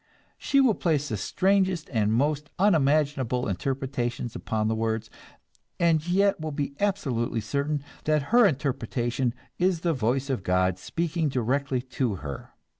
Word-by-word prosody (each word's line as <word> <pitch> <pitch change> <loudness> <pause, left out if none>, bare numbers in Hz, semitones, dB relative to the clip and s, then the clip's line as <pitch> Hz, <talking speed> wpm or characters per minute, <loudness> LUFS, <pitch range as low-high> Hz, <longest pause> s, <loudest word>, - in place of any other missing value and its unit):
She 275 - +2
will 260 -5 +5
place 150 -6 0
the 110 - -1
strangest 185 - +1
and 110 -4 +1
most 145 +5 0
unimaginable 145 - +2
interpretations 120 +2 -2
upon 110 -1 -1
the 110 - +1
words, 110 0 -2 0.7
and 165 -1 +2
yet 195 +2 +3
will 155 0 -3
be 140 -1 -3
absolutely 135 - 0
certain 140 +6 -2 0.2
that 150 -2 +1
her 240 -3 +7
interpretation 125 - -1 0.3
is 180 -2 +2
the 170 -1 +1
voice 130 +2 0
of 125 - -1
God 90 0 +1
speaking 165 - -1
directly 130 +1 0
to 130 -4 -2
her. 75 -6 -7
140 Hz, 140 wpm, -26 LUFS, 120-160 Hz, 0.7 s, her